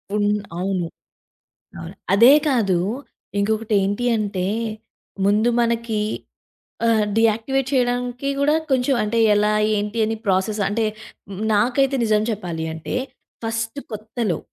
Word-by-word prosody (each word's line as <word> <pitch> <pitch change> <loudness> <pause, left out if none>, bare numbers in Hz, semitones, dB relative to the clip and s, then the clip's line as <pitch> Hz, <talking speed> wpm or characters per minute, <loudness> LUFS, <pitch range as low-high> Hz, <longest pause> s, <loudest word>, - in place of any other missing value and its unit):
ఉన్ 205 0 +2 0.3
అవును. 185 -2 -1 0.9
అవును. 80 - -8 0.2
అదే 235 +7 +8 0.2
కాదు. 205 -9 +2 0.6
ఇంకొకటి 220 +1 0
ఏంటి 205 +5 -1
అంటే, 200 -3 -2 0.8
ముందు 210 +4 +3
మనకి, 230 -2 0 0.9
ఆహ్, 220 -2 +3
డియాక్టివేట్ 230 +4 +2
చేయడానికి 245 +1 0
కూడా 295 +2 +3 0.2
కొంచం 260 +1 +2
అంటే, 230 +2 0 0.2
ఎలా 210 +1 +2 0.2
ఏంటి 210 +2 -2
అని 225 0 -2
ప్రాసెస్ 195 +3 +1
అంటే, 220 +1 0 0.7
నాకైతే 260 +6 +2
నిజం 215 -1 +2
చెప్పాలి 170 -6 -4
అంటే 160 +9 -5 0.5
ఫస్ట్ 225 +4 -3
కొత్తలో... 215 -3 -3
220 Hz, 110 wpm, -21 LUFS, 205-245 Hz, 0.9 s, అదే